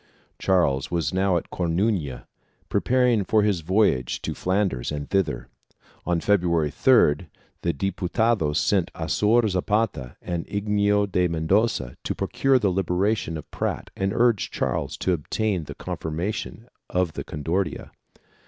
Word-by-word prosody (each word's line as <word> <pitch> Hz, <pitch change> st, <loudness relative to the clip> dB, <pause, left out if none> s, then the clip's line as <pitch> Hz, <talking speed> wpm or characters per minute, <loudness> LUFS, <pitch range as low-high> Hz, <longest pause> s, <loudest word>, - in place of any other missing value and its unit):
Charles 75 Hz, -8 st, +2 dB
was 85 Hz, -5 st, -1 dB
now 95 Hz, -1 st, +2 dB
at -, -, -6 dB
Coruna, 85 Hz, -, -1 dB, 0.4 s
preparing 125 Hz, -4 st, +2 dB
for 105 Hz, +2 st, +2 dB
his 100 Hz, -5 st, +1 dB
voyage 85 Hz, -, +1 dB
to -, -, -2 dB
Flanders 95 Hz, -10 st, -1 dB
and 75 Hz, -1 st, -4 dB
thither, 95 Hz, -2 st, 0 dB, 0.6 s
on 85 Hz, -1 st, +2 dB
February 85 Hz, -6 st, +2 dB
3d, 90 Hz, -, +4 dB, 0.3 s
the 85 Hz, -, +1 dB
Diputados 95 Hz, -, 0 dB
sent 95 Hz, -4 st, +2 dB
Azor 110 Hz, +2 st, +2 dB
Zapata 95 Hz, -, -1 dB
and 85 Hz, -2 st, -4 dB
Inigo 105 Hz, 0 st, +1 dB
de 90 Hz, -2 st, +1 dB
Mendoza 80 Hz, -, 0 dB
to -, -, -2 dB
procure 135 Hz, -1 st, +2 dB
the 105 Hz, -6 st, +1 dB
liberation 95 Hz, -1 st, 0 dB
of 75 Hz, -, -10 dB
Prat -, -, -3 dB
and 95 Hz, 0 st, 0 dB
to 100 Hz, -, -4 dB
urge 120 Hz, -4 st, +3 dB
Charles -, -, -2 dB
to 95 Hz, -, +1 dB
obtain 90 Hz, +2 st, -1 dB
the -, -, -8 dB
confirmation 90 Hz, +8 st, -4 dB, 0.2 s
of 90 Hz, -3 st, 0 dB
the -, -, -5 dB
Concordia. 85 Hz, +6 st, -3 dB
95 Hz, 135 wpm, -24 LUFS, 80-105 Hz, 0.6 s, 3d